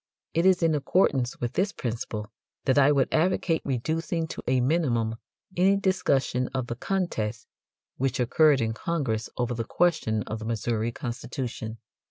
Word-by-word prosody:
It 165 +3 +3
is 185 -2 +4
in 165 -1 +4
accordance 140 -4 +1
with 120 0 -2
this 195 +3 +1
principle 110 - -4 0.3
that 135 +1 +4
I 140 +1 +6
would 140 -3 +2
advocate 165 0 +2
reducing 160 +5 -1
to - - -6
a 130 0 +3
minimum 120 -6 +1 0.4
any 190 +3 +4
discussion 135 -10 +1
of 130 -2 0
the 120 - -4
contest 115 - -2 0.5
which 130 -1 0
occurred 140 +3 +4
in 110 -1 0
Congress 120 -6 -2
over 120 -1 0
the 115 -1 -2
question 140 - +1
of 110 - -5
the 110 - -7
Missouri 115 0 -1
constitution. 120 -3 -5
130 Hz, 155 wpm, -27 LUFS, 115-165 Hz, 0.5 s, I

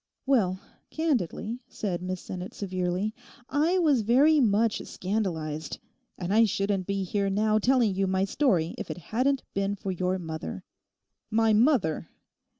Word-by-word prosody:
'Well, 205 -9 +2 0.3
candidly,' 245 - -1
said 185 -5 -3
Miss 185 0 -4
Sinnett 185 0 -7
severely. 185 +1 -2 0.4
'I 310 +6 +2
was 300 -9 +3
very 275 +8 +5
much 220 -2 +2
scandalised; 165 -6 -3 0.4
and 180 +2 -2
I 225 +1 +6
shouldn't 195 -2 -1
be 200 -1 -1
here 200 +2 0
now 215 +2 +2
telling 240 -2 +3
you 195 +1 0
my 190 +1 +1
story 190 - +1
if - - -6
it - - -4
hadn't 255 - 0
been 200 +1 0
for 195 -1 -4
your 185 +1 -1
mother.' 160 - -6 0.7
'My 225 0 +3
mother! 215 - +2
200 Hz, 145 wpm, -27 LUFS, 185-235 Hz, 0.7 s, I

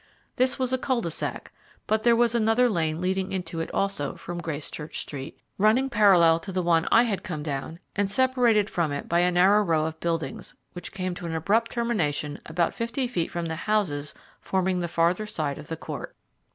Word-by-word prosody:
This 255 0 +2
was 260 -1 -1
a 260 - +1
cul 255 -2 0
de 170 - -3
sac, - - -4 0.3
but 220 0 +1
there 235 +1 +4
was 235 0 +3
another 235 +2 +3
lane 165 -7 0
leading 190 +1 -1
into 175 -3 -3
it 165 - -3
also 195 -8 -1
from 175 0 -6
Gracechurch 150 -1 -5
Street 135 -2 -6 0.2
running 235 +6 +3
parallel 180 -7 +5
to 190 - -7
the 185 -1 -1
one 165 -1 +2
I 230 - +7
had 215 -5 -1
come 155 -4 -5
down, 145 +2 -4 0.2
and 205 -1 +1
separated 240 -3 +3
from 170 -7 -1
it 145 - -4
by 170 - +2
a 180 +1 +4
narrow 190 +4 +5
row 165 -5 +1
of 160 0 -5
buildings, 165 -5 -3 0.2
which 175 -1 -7
came 185 -1 -3
to 175 -1 -6
an 165 - -3
abrupt 210 +8 +1
termination 165 -12 -1
about 165 +2 0
fifty 235 +3 -2
feet 180 -9 -2
from 170 -1 -3
the 160 -1 -3
houses 165 -6 -1 0.2
forming 185 -1 0
the 175 - -1
farther 170 +5 +1
side 150 -7 -3
of 150 - -10
the 165 - -4
court. - - -7
180 Hz, 205 wpm, -26 LUFS, 165-215 Hz, 0.3 s, I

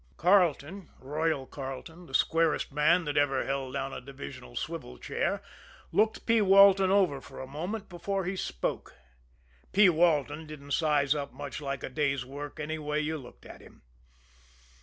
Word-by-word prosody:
Carleton, 180 0 +2
"Royal" 150 0 -1
Carleton, 145 +7 -8
the 135 - -5
squarest 165 0 +2
man 160 +5 +3
that 145 0 -2
ever 135 -2 +2
held 135 -1 -3
down 135 -1 -3
a - - -6
divisional 70 - -10
swivel 60 - -5
chair, - - -2 0.5
looked 220 +1 +1
P. 230 -1 +4
Walton 195 -1 +7
over 185 -8 +3
for - - -12
a - - -5
moment 180 +10 -5
before 190 +2 -3
he 185 +2 -2
spoke. 65 - -4 0.8
P. 205 -1 +7
Walton 155 -2 +2
didn't 145 -2 -10
size 145 -2 +2
up 140 -2 -4
much 140 +1 -7
like 140 -2 -4
a - - -4
day's 135 -1 0
work 145 +3 -8
anyway 150 0 -2
you 155 +1 -2
looked 130 -5 -11
at - - -12
him. - - -18
150 Hz, 160 wpm, -29 LUFS, 140-175 Hz, 0.8 s, Walton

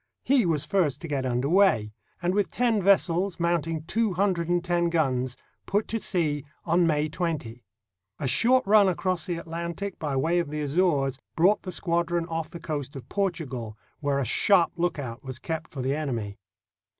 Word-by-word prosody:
He 255 -7 +3
was 155 -3 0
first 150 -6 +1
to 170 - -5
get 135 -3 -1
under 125 +2 0
way, 160 - +3 0.3
and 175 +1 +1
with 205 -1 +1
ten 235 -4 +1
ves 195 +1 +5
sels, 180 +2 -2
mounting 165 -2 0
two 220 +4 0
hundred 180 -2 0
and 175 -1 +1
ten 175 -1 +1
guns, 130 -6 0 0.3
put 205 +2 0
to 225 - -1
sea 155 -9 -1 0.2
on 170 +1 +3
May 150 -1 +1
20. 150 -8 -4 0.5
A 140 - -2
short 245 - +4
run 205 -1 +6
across 185 +2 -1
the 175 - -1
Atlantic 170 +4 -5
by 145 -3 -2
way 165 +6 +2
of 170 - -2
the 150 0 -3
Azores 145 -3 +1 0.2
brought 185 +6 +4
the 185 - -6
squadron 170 -1 0
off 165 -1 -4
the 170 - -9
coast 145 -3 -4
of 135 - -8
Portugal, 135 - -3 0.2
where 145 -2 0
a 140 - 0
sharp 175 - +4
lookout 145 -9 -3
was 130 -2 -6
kept 160 +3 -4
for 135 -3 -5
the 135 +2 0
enemy. 115 -10 -3
165 Hz, 185 wpm, -26 LUFS, 140-180 Hz, 0.5 s, run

